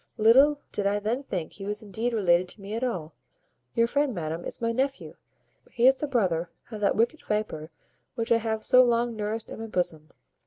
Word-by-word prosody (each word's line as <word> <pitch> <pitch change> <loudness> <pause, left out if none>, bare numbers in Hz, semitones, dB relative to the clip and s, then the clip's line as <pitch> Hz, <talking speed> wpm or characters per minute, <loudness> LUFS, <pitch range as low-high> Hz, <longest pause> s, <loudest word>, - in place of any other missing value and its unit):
Little 265 +7 +6
did 200 -1 0
I 205 +1 +1
then 220 +6 -1
think 185 - -4
he 195 - -9
was 210 +1 -3
indeed 220 +4 -2
related 180 -5 +3
to 200 - -9
me 200 +2 -7
at 230 +3 -2
all. 175 -11 -3 0.6
Your 230 -1 +4
friend, 280 0 0
madam, 165 0 -4
is - - -5
my 230 0 0
nephew; 270 +3 -2 0.6
he 240 0 +1
is 265 +1 +6
the 300 - -3
brother 180 - 0 0.2
of 215 -2 -6
that 200 - +2
wicked 235 +8 +1
viper 210 -8 -3 0.5
which 230 0 -3
I 230 - +6
have 220 -1 -2
so 255 0 +6
long 235 -1 +1
nourished 215 +1 -3
in - - -7
my 225 - -5
bosom. 165 -6 -2
220 Hz, 205 wpm, -27 LUFS, 195-240 Hz, 0.6 s, Little